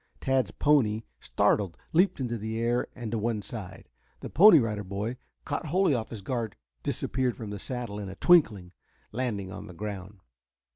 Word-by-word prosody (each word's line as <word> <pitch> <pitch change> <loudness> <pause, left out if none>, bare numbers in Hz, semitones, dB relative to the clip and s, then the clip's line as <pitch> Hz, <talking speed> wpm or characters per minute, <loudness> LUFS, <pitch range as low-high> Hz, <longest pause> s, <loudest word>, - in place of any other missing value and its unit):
Tad's 130 -6 +1
pony, 115 -7 +2 0.2
startled, 95 -5 +1 0.2
leaped 180 +1 +3
into 120 -3 -2
the 110 0 -4
air 120 +1 +1
and 120 -3 -5
to 115 - -1
one 110 -1 -1
side. 105 -2 -8 0.3
The - - -7
Pony 185 +1 +8
Rider 110 -5 0
boy, 100 +6 -4 0.3
caught - - -3
wholly 180 +1 +3
off 115 -3 -2
his 110 -4 -8
guard, 115 -3 -3 0.3
disappeared 130 -2 -1
from 110 -3 -6
the 105 - -5
saddle 120 -4 -5
in 100 -2 -5
a 95 - -8
twinkling, 105 - +4 0.4
landing 105 -6 -3
on - - -8
the 90 - -11
ground. 100 0 -6
115 Hz, 175 wpm, -28 LUFS, 105-130 Hz, 0.4 s, Pony